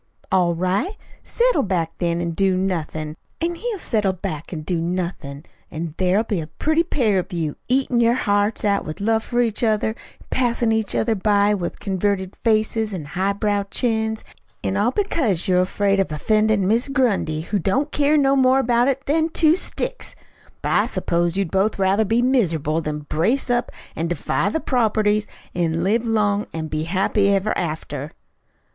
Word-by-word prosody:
"All 180 -3 +3
right. 190 - -1 0.3
Settle - - +2
back, 175 -5 -1
then, 170 -1 0
an' 170 -1 -2
do 190 +2 +1
nothin'; 160 -5 -2 0.2
an' 335 +1 -1
he'll 440 +5 -4
settle 210 - 0
back 160 -3 -6
an' 160 -4 -4
do 165 +1 -2
nothin', 170 -4 -4 0.2
an' 160 -1 -5
there'll 190 +3 +2
be 210 -5 -2
a 155 - -7
pretty 310 - +1
pair 235 - +1
of 185 +2 -5
you, 160 -4 -2
eatin' 255 -1 +2
your 235 0 +4
hearts 205 -2 +1
out 200 -1 +2
with 155 - -7
love 220 +2 +1
for 245 0 0
each 230 -1 0
other, 220 -1 +2
an' 220 - -5 0.4
passin' 240 -2 +1
each 220 -2 0
other 225 0 +1
by 205 0 +2
with 180 -4 -3
converted 190 -1 -1
faces 220 -1 +1
an' 160 -5 -6
highbrow 200 +5 0
chins; 220 -2 0 0.4
an' 190 - -1
all 205 +4 +2
because 255 - 0
you're 180 -1 +4
afraid 195 +1 +1
of 195 - +2
offendin' 215 +5 +2
Mis' 230 +6 +2
Grundy, 225 - 0
who 200 +5 -2
don't 265 - 0
care 295 +1 +3
no 275 -1 +3
more 260 -1 +4
about 245 -2 +2
you 275 - +3
than 315 +2 +2
two 320 0 +4
sticks. - - -3 0.5
But - - -1
I - - +3
s'pose 170 +1 0
you'd 195 -4 -1
both 195 +3 +1
rather 195 +3 +2
be 230 +4 +2
miserable 165 - +1
than 150 -1 -4
brace 205 - 0
up 240 0 0 0.2
an' 165 +2 -2
defy 175 - -1
the 320 - -1
properties 215 -6 +1 0.3
an' 165 -1 0
live 220 +5 +2
long 210 -2 +1
an' 160 -1 -4
be 155 +1 -2
happy 195 +3 +1
ever 200 +2 +1
after." 155 -3 -4
205 Hz, 175 wpm, -21 LUFS, 175-235 Hz, 0.5 s, your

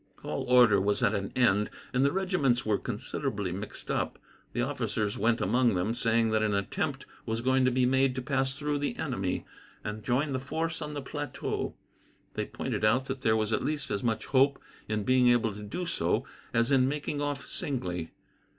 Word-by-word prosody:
All - - -3
order 120 -6 +6
was 100 +1 +1
at - - +3
an 100 0 -2
end, 105 -5 +3 0.2
and 130 +1 +3
the 140 - +4
regiments 180 -10 +1
were 105 -2 +2
considerably 100 -3 -3
mixed 100 +4 -6
up. - - -1 0.3
The - - 0
officers 105 -1 -1
went 115 +2 +2
among 120 -4 +3
them, 90 +5 0
saying 115 -1 +2
that 110 0 +2
an 105 -2 +1
attempt 100 -1 -2 0.2
was 115 +1 -1
going 130 +1 +3
to 130 - +3
be 125 0 +3
made 130 0 +3
to 130 - -2
pass 135 -1 0
through 145 -1 -1
the 145 - -2
enemy, - - -2 0.4
and 105 0 -5
join 135 +5 +1
the 130 - 0
force 160 +5 -2
on 150 -1 -5
the 145 - -4
plateau. 145 -1 -3 0.6
They - - -2
pointed - - -3
out 125 +5 +3
that 135 -1 -4
there 110 -2 +3
was 110 0 0
at - - +1
least 150 -2 -2
as 100 - -1
much 115 -2 0
hope 135 0 +3 0.3
in 110 -1 -1
being 130 +2 +4
able 120 -3 +3
to 105 - -8
do 105 - -4
so - - 0 0.3
as 115 +3 +2
in 130 -1 +4
making 145 0 -3
off 145 -1 -2
singly. 90 - -3
125 Hz, 195 wpm, -29 LUFS, 110-140 Hz, 0.6 s, order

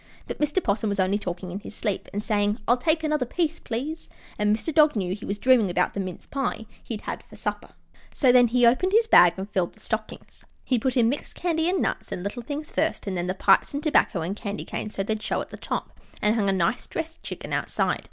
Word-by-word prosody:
But - - -6
Mr. 300 +5 +1
'Possum 210 0 0
was 200 0 -2
only 190 +2 +2
talking 180 -2 -5
in 190 - -4
his 210 - -10
sleep, 210 -4 -3
and 205 +1 -3
saying, 205 -1 +1
"I'll 240 - +5
take 315 +6 +1
another 305 -3 +1
piece, 325 +5 -1
please," 285 +8 -4 0.3
and 210 0 +3
Mr. 320 +7 -4
Dog 305 -2 +5
knew 185 -3 -1
he 205 - -7
was 200 - -2
dreaming 240 -3 +4
about 180 0 +1
the - - -4
mince 185 -2 -5
pie 270 -5 -3 0.2
he'd 220 -3 -5
had - - -5
for - - -16
supper. - - -4 0.4
So, 260 -4 +4
then 245 -1 +6
he 245 +1 +3
opened 355 +12 +3
his 450 +1 +5
bag 175 - +7
and 190 +1 -4
filled 185 -4 -1
the - - -21
stockings. - - -5 0.2
He 250 -3 +2
put 260 +2 0
in 235 -2 +5
mixed 275 +5 -3
candy 330 -1 0
and 375 - +1
nuts - - -3
and 180 - -4
little 200 +5 -4
things 290 +5 -5
first, 320 - -1
and 195 -2 -2
then 175 0 -2
the 185 - -1
pipes 235 - +3
and 285 - -3
tobacco 295 - +2
and 175 +5 -3
candy 205 -1 -5
canes, 215 - -5
so 195 - -1
they'd 215 +1 -2
show - - -1
at - - -5
the - - -8
top, - - -5 0.2
and 210 0 +2
hung 210 -4 +1
a - - +4
nice 190 +4 0
dressed 325 0 -5
chicken - - -6
outside. - - 0
225 Hz, 245 wpm, -25 LUFS, 200-295 Hz, 0.4 s, bag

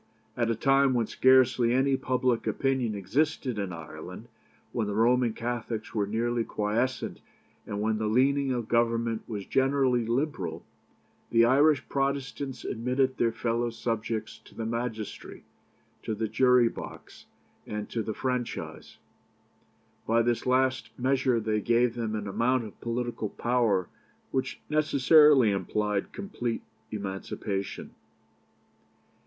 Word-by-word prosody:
At 115 -2 0
a 115 - +1
time 135 +2 +3
when 120 -2 +2
scarcely 130 -1 +4
any 135 +1 +3
public 125 -2 0
opinion 130 -5 0
existed 125 +4 -1
in 100 -2 -3
Ireland, 85 -3 -9 0.4
when 110 -3 -1
the 105 - -3
Roman 120 +2 +3
Catholics 115 -1 -4
were 105 -2 0
nearly 115 +2 0
quiescent, 115 +5 -2 0.5
and 105 0 -3
when 110 0 0
the 110 - 0
leaning 135 +4 +2
of 120 -3 -2
Government 115 -1 +1
was 105 -3 -4
generally 135 -2 +2
liberal, 120 - -2 0.6
the 115 0 +5
Irish 140 +2 +4
Protestants 135 -1 -2
admitted 130 +3 0
their 115 - +2
fellow 120 +1 -1
subjects 115 -1 -3
to - - -17
the 115 - -4
magistracy, 115 -2 -5 0.6
to 110 - -3
the 110 +1 -2
jury 125 +1 +4
box, - - -9 0.4
and 105 0 -4
to 115 - -1
the 110 -1 -4
franchise. 125 -2 -4 1.1
By 115 +1 +3
this 120 +1 0
last 130 -2 +2
measure 130 -1 +2
they 110 -1 -1
gave 120 +2 +2
them 115 -2 -3
an 105 -1 -4
amount 120 +5 +1
of 105 - -11
political 120 -2 -3
power 115 -7 +1 0.4
which 130 0 -2
necessarily 150 -4 +5
implied 100 +1 -1
complete 125 - -4 0.3
emancipation. 100 -1 -4
120 Hz, 125 wpm, -28 LUFS, 110-130 Hz, 1.1 s, the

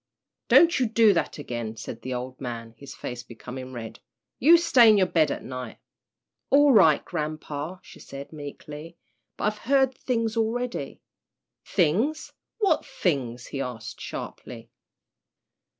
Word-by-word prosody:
"Don't 340 -3 +6
you 250 - +2
do 220 -1 +5
that 165 - -1
again," 120 -6 -5
said 115 +1 -7
the 130 - -6
old 130 +1 -5
man, 115 -3 -6
his 135 +3 -11
face 120 -1 -6
becoming 125 +2 -9
red. 115 -3 -8 0.4
"You 330 +6 +7
stay 265 -9 +6
in 215 - +6
your 190 - +4
bed 160 -4 +2
at - - -4
night." 125 -3 -7 0.7
"All 285 +1 +6
right, 160 -9 +5
grampa," 155 +2 -4
she - - -14
said, 140 +3 -9
meekly, 150 +2 -9 0.4
"but - - -6
I've 210 0 0
heard 265 +1 +2
things 230 -3 -1
already." 235 +2 -2 0.6
"Things 215 - 0 0.2
what 395 -8 +2
things?" 130 - -2
he 135 - -5
asked, 115 -4 -6
sharply. 115 -1 -8
155 Hz, 140 wpm, -26 LUFS, -, 0.7 s, You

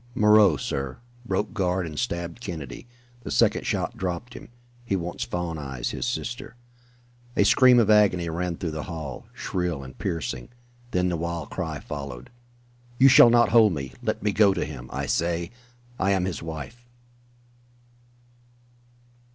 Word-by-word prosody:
"Moreau, 105 -6 +6
sir! 70 -1 -3 0.3
Broke 95 0 -1
guard 90 -2 0
and 75 -3 -5
stabbed 85 +5 -3
Kennedy. 80 - -7 0.3
The - - -7
second - - +2
shot - - -1
dropped 95 +6 -4
him. - - -11 0.3
He 110 -5 -1
wants 90 -1 -3
Fawn 85 -3 -3
Eyes, 65 -4 -4
his - - -3
sister." 120 -1 -4 0.8
A - - +5
scream 125 +3 +6
of 110 -3 +4
agony 100 -5 +4
rang 85 +1 -2
through 85 - -3
the 75 0 -4
hall, 80 -6 -6
shrill 90 -6 -3
and 65 - -11
piercing. 80 -7 -4 0.4
Then 90 -4 +1
the 85 - -1
wild 85 -2 -4
cry 80 -5 -4
followed: 70 -5 -7 0.7
"You 135 +2 +7
shall 125 -2 +9
not 120 0 +5
hold 110 -4 +6
me! 70 -4 -5
Let - - -2
me 105 - +2
go 100 -1 +4
to 85 - -1
him, 65 -4 -8
I - - -3
say 85 0 -1 0.5
I 95 - +1
am 95 -2 +1
his 95 -4 -4
wife!" 80 +10 -8
90 Hz, 155 wpm, -25 LUFS, 80-105 Hz, 0.8 s, shall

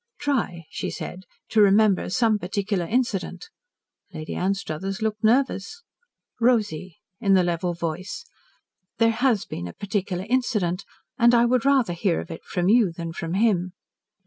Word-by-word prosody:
"Try," 230 - -1
she - - -3
said, 185 +1 -7 0.2
"to 220 - +4
remember 205 -1 +4
some 220 +1 +2
particular 195 -1 -2
incident." 210 -7 -2 0.6
Lady 155 -3 -6
Anstruthers 190 +1 -2
looked 215 0 -2
nervous. 255 - +1 0.6
"Rosy," 210 -8 +1 0.2
in 200 -4 +3
the 185 - +4
level 175 0 -1
voice, 170 +2 -4 0.7
"there 230 0 +4
has 230 -2 +1
been 85 - -6
a 85 - -8
particular 195 -2 -3
incident 210 -7 0 0.3
and 235 +1 +6
I 235 0 +5
would 250 +1 +2
rather 265 -9 +3
hear 175 0 0
of - - -7
it 165 - -8
from 180 -2 -2
you 215 -3 +4
than 165 0 -6
from 165 +1 -4
him." 190 -4 +2
200 Hz, 145 wpm, -24 LUFS, 175-230 Hz, 0.7 s, and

